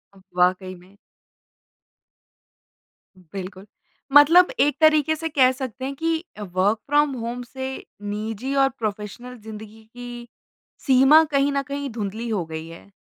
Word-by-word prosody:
वाक़ई 185 Hz, 0 st, -1 dB
में। 185 Hz, +3 st, -20 dB, 2.4 s
बिल्कुल। 190 Hz, 0 st, -7 dB, 0.5 s
मतलब 330 Hz, -, +7 dB
एक 290 Hz, +1 st, +2 dB
तरीके 310 Hz, 0 st, +4 dB
से 325 Hz, +1 st, -4 dB
कह 260 Hz, -3 st, +4 dB
सकते 260 Hz, -1 st, -6 dB
हैं 275 Hz, +1 st, -4 dB
कि 325 Hz, +2 st, -1 dB, 0.2 s
अ, -, -, -8 dB
वर्क 195 Hz, +4 st, 0 dB
फ्रॉम 295 Hz, 0 st, +3 dB
होम 240 Hz, +1 st, -4 dB
से 265 Hz, +2 st, -6 dB, 0.3 s
निजी 220 Hz, +5 st, -4 dB
और 270 Hz, 0 st, +4 dB
प्रोफेशनल 215 Hz, +4 st, -5 dB
ज़िंदगी 220 Hz, 0 st, -11 dB
की, 240 Hz, -1 st, -9 dB, 0.6 s
सीमा 270 Hz, +5 st, +6 dB
कहीं 280 Hz, 0 st, +2 dB
न 280 Hz, 0 st, 0 dB
कहीं 280 Hz, 0 st, -5 dB
धुंधली 220 Hz, +1 st, -5 dB
हो 195 Hz, -6 st, -1 dB
गई 160 Hz, 0 st, -7 dB
है। 165 Hz, +4 st, -13 dB
240 Hz, 135 wpm, -23 LUFS, 205-280 Hz, 2.4 s, मतलब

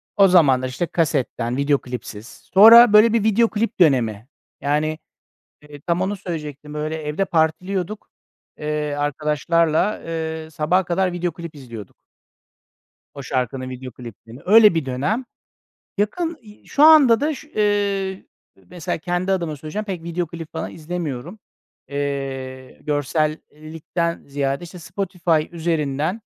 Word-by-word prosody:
o 195 Hz, -1 st, +6 dB
zaman 145 Hz, -8 st, +5 dB
da 130 Hz, -, -2 dB
işte 130 Hz, +7 st, -2 dB
kasetten, 130 Hz, -6 st, -1 dB
video 140 Hz, 0 st, +2 dB
klipsiz. 120 Hz, -3 st, -8 dB, 0.3 s
Sonra 225 Hz, +3 st, +9 dB
böyle 215 Hz, +2 st, +7 dB
bir 225 Hz, -3 st, +2 dB
video 220 Hz, +1 st, +3 dB
klip 220 Hz, -1 st, -2 dB
dönemi. 120 Hz, -, +2 dB, 0.3 s
Yani, 155 Hz, +2 st, 0 dB, 0.6 s
eee, 145 Hz, -1 st, -13 dB
tam 175 Hz, +2 st, -1 dB
onu 200 Hz, +2 st, -1 dB
söyleyecektim. 150 Hz, -5 st, -7 dB
Öyle 155 Hz, +1 st, -3 dB
evde 155 Hz, +5 st, -2 dB
partiliyorduk. 180 Hz, +5 st, -1 dB, 0.5 s
Eee, 150 Hz, -1 st, -2 dB
arkadaşlarla, 155 Hz, +5 st, 0 dB
eee, 160 Hz, -1 st, -4 dB
sabaha 165 Hz, +5 st, +1 dB
kadar 180 Hz, +1 st, 0 dB
video 175 Hz, 0 st, -2 dB
klip 170 Hz, -1 st, -9 dB
izliyorduk. 115 Hz, -8 st, -10 dB, 1.2 s
O 140 Hz, -, -8 dB
şarkının 130 Hz, 0 st, -3 dB
video 130 Hz, 0 st, -8 dB
kliplerini. 115 Hz, +2 st, -12 dB
Öyle 210 Hz, -2 st, +7 dB
bir 160 Hz, -4 st, 0 dB
dönem. 150 Hz, -, -2 dB, 0.7 s
Yakın, 325 Hz, -, -1 dB
i 210 Hz, -2 st, -17 dB
şu 285 Hz, -, +1 dB
anda 290 Hz, -7 st, +7 dB
da, 305 Hz, +2 st, 0 dB, 0.2 s
eee, 200 Hz, -2 st, 0 dB, 0.4 s
mesela 175 Hz, -1 st, -4 dB
kendi 175 Hz, +3 st, -1 dB
adıma 170 Hz, -5 st, -2 dB
söyleyeceğim, 155 Hz, +9 st, -5 dB
pek 185 Hz, -5 st, -5 dB
video 170 Hz, +1 st, -3 dB
klip 165 Hz, 0 st, -9 dB
falan 160 Hz, 0 st, -4 dB
izlemiyorum. 165 Hz, -, -5 dB, 0.5 s
Eee, 135 Hz, -2 st, -5 dB
görsellikten 155 Hz, +3 st, -3 dB
ziyade, 140 Hz, +2 st, -2 dB
işte, 175 Hz, +1 st, -11 dB
Spotify 175 Hz, -3 st, -1 dB
üzerinden, 160 Hz, +2 st, -1 dB
160 Hz, 130 wpm, -21 LUFS, 145-190 Hz, 1.2 s, Sonra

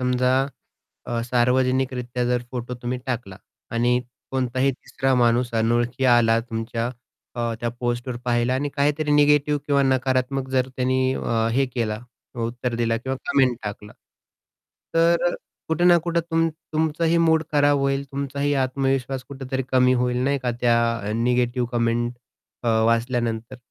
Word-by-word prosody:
समजा 125 Hz, 0 st, +2 dB, 0.7 s
अ, 120 Hz, -1 st, -2 dB
सार्वजनिकरित्या 125 Hz, 0 st, +1 dB
जर 125 Hz, 0 st, +1 dB
फोटो 125 Hz, -1 st, -5 dB
तुम्ही 125 Hz, +1 st, -2 dB
टाकला 120 Hz, -7 st, -4 dB, 0.4 s
आणि 120 Hz, +1 st, +2 dB, 0.3 s
कोणताही 130 Hz, +1 st, +1 dB
तिसरा 135 Hz, +1 st, -1 dB
माणूस 120 Hz, +1 st, +2 dB
अनोळखी 120 Hz, +3 st, 0 dB
आला 115 Hz, -1 st, +4 dB
तुमच्या 115 Hz, 0 st, -3 dB, 0.4 s
अ, 120 Hz, -1 st, -2 dB
त्या 120 Hz, -, -1 dB
पोस्टवर 120 Hz, 0 st, -2 dB
पाहिला 120 Hz, +1 st, +1 dB
आणि 145 Hz, +2 st, -1 dB
काहीतरी 150 Hz, +1 st, +1 dB
निगेटिव्ह 145 Hz, 0 st, +4 dB
किंवा 140 Hz, -1 st, +3 dB
नकारात्मक 130 Hz, 0 st, 0 dB
जर 130 Hz, 0 st, +1 dB
त्यांनी 130 Hz, 0 st, +1 dB, 0.2 s
अ, 115 Hz, -2 st, 0 dB
हे 135 Hz, +3 st, +2 dB
केला 110 Hz, -3 st, -1 dB, 0.5 s
उत्तर 120 Hz, 0 st, -3 dB
दिलं 115 Hz, -1 st, +1 dB
किंवा 130 Hz, 0 st, -2 dB
कमेंट 130 Hz, -3 st, +3 dB
टाकला. 105 Hz, 0 st, -6 dB, 1.0 s
तर 170 Hz, +1 st, +3 dB, 0.3 s
कुठे 160 Hz, +2 st, +1 dB
ना 175 Hz, -1 st, +7 dB
कुठे 170 Hz, 0 st, +1 dB
तुमचं 165 Hz, 0 st, 0 dB, 0.2 s
तुमचंही 160 Hz, +1 st, +1 dB
मूड 160 Hz, -1 st, +3 dB
खराब 145 Hz, -1 st, +4 dB
होईल, 140 Hz, 0 st, 0 dB
तुमचाही 140 Hz, +1 st, -1 dB
आत्मविश्वास 135 Hz, 0 st, -1 dB
कुठेतरी 135 Hz, -1 st, -4 dB
कमी 130 Hz, 0 st, +5 dB
होईल 125 Hz, 0 st, 0 dB
नाही 140 Hz, 0 st, +1 dB
का 125 Hz, -, 0 dB
त्या 120 Hz, -1 st, +4 dB, 0.4 s
निगेटिव्ह 120 Hz, +1 st, +1 dB
कमेंट 120 Hz, 0 st, 0 dB, 0.5 s
अ, -, -, +1 dB, 0.2 s
वाचल्यानंतर. 115 Hz, 0 st, -1 dB
125 Hz, 135 wpm, -23 LUFS, 120-140 Hz, 1.0 s, ना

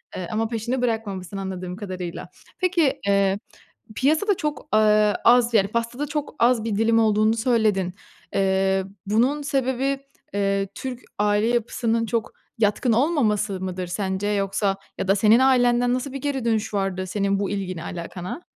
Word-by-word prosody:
eee, 180 Hz, -, -4 dB
ama 225 Hz, +1 st, 0 dB
peşini 235 Hz, +3 st, -2 dB
bırakmamışsın 205 Hz, -6 st, -2 dB
anladığım 185 Hz, -2 st, -5 dB
kadarıyla. 185 Hz, -4 st, -6 dB, 0.3 s
Peki, 345 Hz, -6 st, +2 dB
eee, 200 Hz, 0 st, +2 dB, 0.6 s
piyasada 315 Hz, -, +2 dB
çok, 300 Hz, -2 st, -3 dB
aaa, 215 Hz, -1 st, +4 dB
az 240 Hz, 0 st, +5 dB
yani 200 Hz, -3 st, +4 dB
pastada 235 Hz, +6 st, -2 dB
çok 295 Hz, 0 st, -4 dB
az 235 Hz, -2 st, +3 dB
bir 225 Hz, -3 st, -2 dB
dilim 225 Hz, +2 st, +3 dB
olduğunu 215 Hz, 0 st, +3 dB
söyledin. 220 Hz, -6 st, +1 dB, 0.4 s
Eee, 190 Hz, 0 st, +2 dB, 0.2 s
bunun 245 Hz, +8 st, +2 dB
sebebi, 270 Hz, 0 st, 0 dB, 0.3 s
eee, 200 Hz, -1 st, 0 dB
Türk 255 Hz, -2 st, -5 dB, 0.2 s
aile 210 Hz, +1 st, +2 dB
yapısının 230 Hz, -1 st, 0 dB
çok 230 Hz, 0 st, -2 dB, 0.3 s
yatkın 225 Hz, +2 st, +2 dB
olmaması 215 Hz, -, +1 dB
mıdır 185 Hz, -1 st, -4 dB
sence 190 Hz, +2 st, -2 dB
yoksa 195 Hz, -1 st, 0 dB, 0.2 s
ya -, -, -3 dB
da 195 Hz, -, +4 dB
senin 215 Hz, +3 st, +5 dB
ailenden 245 Hz, -2 st, +3 dB
nasıl 255 Hz, +2 st, -3 dB
bir 275 Hz, -, -5 dB
geri 270 Hz, -3 st, -2 dB
dönüş 220 Hz, -2 st, 0 dB
vardı 195 Hz, -2 st, -1 dB
senin 200 Hz, +1 st, 0 dB
bu 200 Hz, -, -1 dB
ilgine 185 Hz, -4 st, -4 dB
alakana? 180 Hz, -, -6 dB
215 Hz, 150 wpm, -23 LUFS, 195-245 Hz, 0.6 s, az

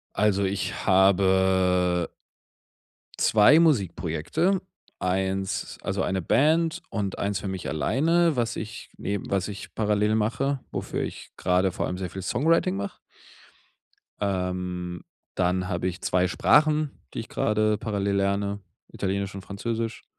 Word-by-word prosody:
Also, 100 Hz, -1 st, +2 dB
ich 95 Hz, 0 st, -2 dB
habe 95 Hz, -2 st, +3 dB, 1.1 s
2 110 Hz, +9 st, +6 dB
Musikprojekte, 130 Hz, -, +1 dB, 0.4 s
1 95 Hz, +1 st, -1 dB
also 95 Hz, 0 st, -1 dB
eine 95 Hz, -1 st, -1 dB
Band 160 Hz, -, +2 dB
und 100 Hz, -3 st, -3 dB
1 100 Hz, -1 st, -1 dB
für 95 Hz, -, -5 dB
mich 95 Hz, -2 st, -4 dB
alleine, 160 Hz, -, +2 dB
was 120 Hz, -3 st, -1 dB
ich 110 Hz, 0 st, -7 dB
neben 100 Hz, -1 st, -4 dB
was 100 Hz, -1 st, 0 dB
ich 105 Hz, -1 st, -8 dB
parallel 105 Hz, 0 st, +1 dB
mache, 115 Hz, +6 st, 0 dB
wofür -, -, -3 dB
ich -, -, -6 dB
gerade 90 Hz, +1 st, +2 dB
vor -, -, -3 dB
allem 90 Hz, -, -3 dB
sehr 95 Hz, -1 st, -3 dB
viel 95 Hz, +2 st, -7 dB
Songwriting 130 Hz, -, +2 dB
mach. 100 Hz, 0 st, -5 dB, 1.2 s
Ähm, 90 Hz, -3 st, -2 dB, 0.3 s
dann 90 Hz, 0 st, 0 dB
habe 90 Hz, 0 st, -2 dB
ich 90 Hz, 0 st, -6 dB
2 90 Hz, 0 st, +2 dB
Sprachen, 150 Hz, -, +3 dB, 0.2 s
die -, -, -2 dB
ich -, -, -8 dB
gerade 110 Hz, 0 st, +1 dB
parallel 100 Hz, -2 st, -1 dB
lerne, 100 Hz, +1 st, 0 dB, 0.3 s
Italienisch 100 Hz, 0 st, -2 dB
und 95 Hz, -, -7 dB
Französisch. 115 Hz, +3 st, -4 dB
100 Hz, 130 wpm, -26 LUFS, 95-110 Hz, 1.2 s, 2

